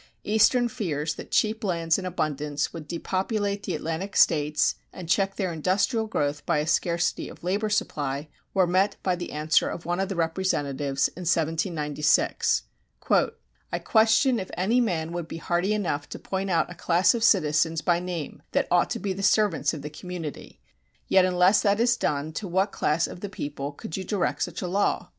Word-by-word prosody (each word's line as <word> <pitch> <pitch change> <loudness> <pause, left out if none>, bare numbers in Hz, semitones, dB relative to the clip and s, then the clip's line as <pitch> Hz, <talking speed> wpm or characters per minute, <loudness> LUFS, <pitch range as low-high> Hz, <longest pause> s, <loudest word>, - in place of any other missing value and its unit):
Eastern 220 +4 +4
fears 165 - -2
that - - -9
cheap 220 0 +1
lands 170 -3 +1
in 185 - -4
abundance 150 -4 -2
would 160 -3 -8
depopulate 200 +4 -2
the 180 - -3
Atlantic 165 +6 -4
States 150 -1 +3 0.2
and 180 - -9
check 195 +3 +1
their 185 -4 -2
industrial 195 - +1
growth 145 -7 -1
by - - +1
a 150 - 0
scarcity 170 +1 0
of - - -13
labor 200 +4 0
supply 145 -8 -1 0.2
were 190 -2 +3
met 185 +3 +2
by 185 -2 +1
the 175 0 -6
answer 155 +1 +2
of 170 - -6
one 175 +2 -1
of 195 0 -1
the 195 - -3
representatives 145 -5 0
in 180 - -11
1796: 155 -2 +1 1.1
I - - 0
question 230 +3 +3
if 190 - -6
any 220 +8 +2
man 165 -8 -1
would 175 -2 -4
be 165 - -6
hardy 175 +4 0
enough 175 -9 -1
to - - -6
point 190 0 -3
out 170 0 +1
a - - -5
class 175 +3 +3
of 235 -2 -2
citizens 160 -4 +3
by 175 -1 +2
name 175 -4 -5
that - - +1
ought 175 0 +3
to - - -3
be 200 -2 -2
the 195 - -6
servants 205 -3 +2
of 155 -4 -7
the 150 - -6
community; 165 -1 -7 0.5
yet 190 -1 +5
unless 185 +2 +4
that 200 0 +2
is 235 0 +4
done 150 -7 -2
to 195 +5 -4
what 190 +3 +1
class 155 +2 +1
of - - -8
the 205 - -5
People 145 -5 -5
could 150 +2 -7
you 190 - -3
direct 190 -1 -1
such - - -3
a - - -2
law? 195 +3 0
175 Hz, 190 wpm, -26 LUFS, 155-195 Hz, 1.1 s, yet